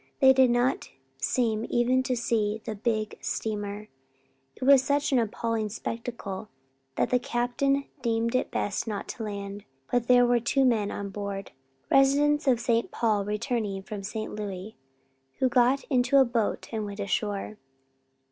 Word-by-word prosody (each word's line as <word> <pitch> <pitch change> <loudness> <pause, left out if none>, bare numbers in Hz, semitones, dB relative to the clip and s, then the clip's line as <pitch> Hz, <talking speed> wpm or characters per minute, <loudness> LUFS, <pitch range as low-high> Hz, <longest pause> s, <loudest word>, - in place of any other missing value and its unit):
They 265 -2 +7
did 260 -1 +5
not 245 +2 +1 0.3
seem 225 - 0
even 250 +2 +2
to 260 -1 -1
see 220 -2 0
the 220 - -3
big 215 0 -2
steamer. 210 -1 -3 0.7
It - - -8
was 275 0 +7
such 285 +2 0
an 260 - +4
appalling 225 -1 -1
spectacle 220 -2 -5 0.5
that - - 0
the 250 - +4
captain 245 +4 0 0.2
deemed 230 -1 0
it 255 - +1
best 205 +2 -2
not 210 -2 -4
to 230 - -5
land, 200 -1 -5 0.3
but 245 -1 +1
there 245 -1 +6
were 240 0 +3
two 265 +3 +2
men 220 -5 +2
on 200 -1 -5
board, 200 0 -5 0.4
residents 290 +2 +4
of 250 -3 +4
St. 235 -1 +1
Paul 215 -4 0
returning 210 -2 -2
from 205 +1 -6
St. 215 +2 -5
Louis 205 0 -6 0.6
who 260 - +2
got 250 +2 +3
into 255 0 +2
a 270 - +7
boat 235 -3 -1
and 220 -2 -2
went 205 0 -7
ashore. 205 +1 -2
230 Hz, 155 wpm, -27 LUFS, 210-250 Hz, 0.7 s, They